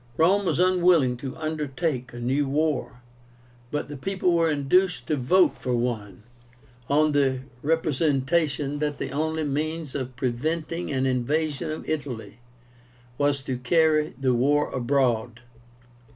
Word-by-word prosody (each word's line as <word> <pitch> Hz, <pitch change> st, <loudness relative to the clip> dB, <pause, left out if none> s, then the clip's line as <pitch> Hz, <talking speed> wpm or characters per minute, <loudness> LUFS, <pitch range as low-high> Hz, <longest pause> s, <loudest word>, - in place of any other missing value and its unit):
Rome 195 Hz, +5 st, +3 dB
was 160 Hz, -, +1 dB
unwilling 175 Hz, -7 st, +4 dB
to 130 Hz, +2 st, -7 dB
undertake 150 Hz, -4 st, -2 dB
a 120 Hz, -, -10 dB
new 135 Hz, +4 st, 0 dB
war, 140 Hz, -4 st, -1 dB, 0.7 s
but 150 Hz, +2 st, -3 dB
the 145 Hz, -, -7 dB
people 185 Hz, +4 st, 0 dB
were 165 Hz, -1 st, +3 dB
induced 150 Hz, -1 st, +2 dB
to 155 Hz, -, 0 dB
vote 175 Hz, +8 st, +3 dB
for 125 Hz, -1 st, -1 dB
one, 110 Hz, -5 st, -3 dB, 0.7 s
on 150 Hz, +2 st, +3 dB
the 135 Hz, -3 st, +1 dB, 0.2 s
representation 145 Hz, -1 st, 0 dB
that 150 Hz, -1 st, -1 dB
the -, -, -4 dB
only 160 Hz, +2 st, -1 dB
means 155 Hz, +1 st, -3 dB
of 130 Hz, -2 st, -4 dB
preventing 155 Hz, +8 st, -2 dB
an 135 Hz, -1 st, 0 dB
invasion 145 Hz, +5 st, -1 dB
of 155 Hz, -, -5 dB
Italy 120 Hz, -8 st, -4 dB, 0.8 s
was 145 Hz, -1 st, +1 dB
to 130 Hz, -2 st, -3 dB
carry 155 Hz, +3 st, +2 dB
the 130 Hz, -2 st, +2 dB
war 145 Hz, +5 st, +2 dB
abroad. 120 Hz, -3 st, 0 dB
145 Hz, 135 wpm, -25 LUFS, 130-160 Hz, 0.8 s, unwilling